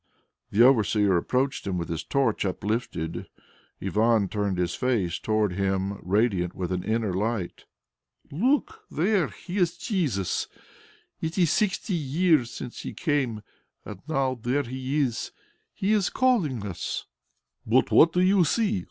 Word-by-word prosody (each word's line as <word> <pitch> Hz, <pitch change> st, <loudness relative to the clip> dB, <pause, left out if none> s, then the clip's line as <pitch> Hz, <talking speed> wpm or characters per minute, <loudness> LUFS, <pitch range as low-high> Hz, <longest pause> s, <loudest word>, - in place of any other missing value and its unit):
The 110 Hz, +4 st, +4 dB
overseer 105 Hz, -6 st, +4 dB
approached 130 Hz, +8 st, 0 dB
him 95 Hz, -2 st, -1 dB
with 85 Hz, -2 st, -3 dB
his 80 Hz, -1 st, -3 dB
torch 130 Hz, +2 st, 0 dB
uplifted. 95 Hz, -4 st, -3 dB, 0.5 s
Ivan 105 Hz, +1 st, +2 dB
turned 100 Hz, -3 st, -1 dB
his 90 Hz, -1 st, 0 dB
face 110 Hz, -9 st, 0 dB
toward 110 Hz, -3 st, 0 dB
him 95 Hz, +1 st, -1 dB
radiant 95 Hz, -2 st, +1 dB
with 90 Hz, -1 st, -3 dB
an 90 Hz, -1 st, -2 dB
inner 110 Hz, -3 st, -1 dB
light. 100 Hz, -1 st, -2 dB, 0.7 s
"Look! 285 Hz, -, 0 dB
There 185 Hz, 0 st, +1 dB
He 185 Hz, +2 st, -8 dB
is 175 Hz, -1 st, +1 dB
Jesus! 150 Hz, -, -1 dB, 0.7 s
It 160 Hz, +2 st, -3 dB
is 175 Hz, -5 st, +3 dB
sixty 205 Hz, 0 st, 0 dB
years 155 Hz, -3 st, +2 dB
since 125 Hz, -, -7 dB
He -, -, -7 dB
came, 135 Hz, -, -1 dB, 0.4 s
and 105 Hz, -3 st, -9 dB
now 135 Hz, -5 st, 0 dB
there 130 Hz, +5 st, 0 dB
He 130 Hz, +3 st, -3 dB
is. 125 Hz, -5 st, -2 dB, 0.4 s
He 195 Hz, +2 st, -1 dB
is 205 Hz, -4 st, +2 dB
calling 175 Hz, -, +1 dB
us!" 95 Hz, -4 st, -4 dB, 0.6 s
"But -, -, +2 dB
what 165 Hz, -, +6 dB
do 180 Hz, -, +1 dB
you 185 Hz, 0 st, +4 dB
see? 210 Hz, +5 st, +1 dB
120 Hz, 145 wpm, -26 LUFS, 100-165 Hz, 0.7 s, what